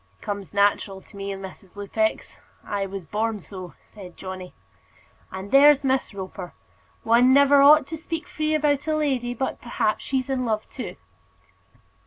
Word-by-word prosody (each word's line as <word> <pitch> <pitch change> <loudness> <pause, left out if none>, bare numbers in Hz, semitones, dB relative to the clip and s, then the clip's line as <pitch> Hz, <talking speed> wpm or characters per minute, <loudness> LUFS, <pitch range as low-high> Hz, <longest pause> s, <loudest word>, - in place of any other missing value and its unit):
"It - - -19
comes 200 -2 -5
natural 200 -1 +1
to 200 - -19
me, 200 0 -5
Mrs. 195 0 -10
Lupex. 220 +2 -2 0.3
I 200 -1 -2
was 195 -2 -7
born 215 +3 -2
so," 185 -1 -10
said 185 -5 -13
Johnny. 185 -1 -8 0.8
"And 190 +1 -7
there's 285 +1 +7
Miss 265 -1 0
Roper 185 -2 -7 0.5
one 235 +3 +5
never 280 0 +6
ought 295 0 +7
to 320 +3 -6
speak 330 +1 -5
free 310 -3 -1
about 295 -1 +1
a 310 - +1
lady, 260 -5 -1
but 265 +3 -3
perhaps 235 -3 -1
she's 260 -2 -1
in 265 -2 -1
love 220 -3 -1
too." - - -6
225 Hz, 160 wpm, -24 LUFS, 195-280 Hz, 0.8 s, there's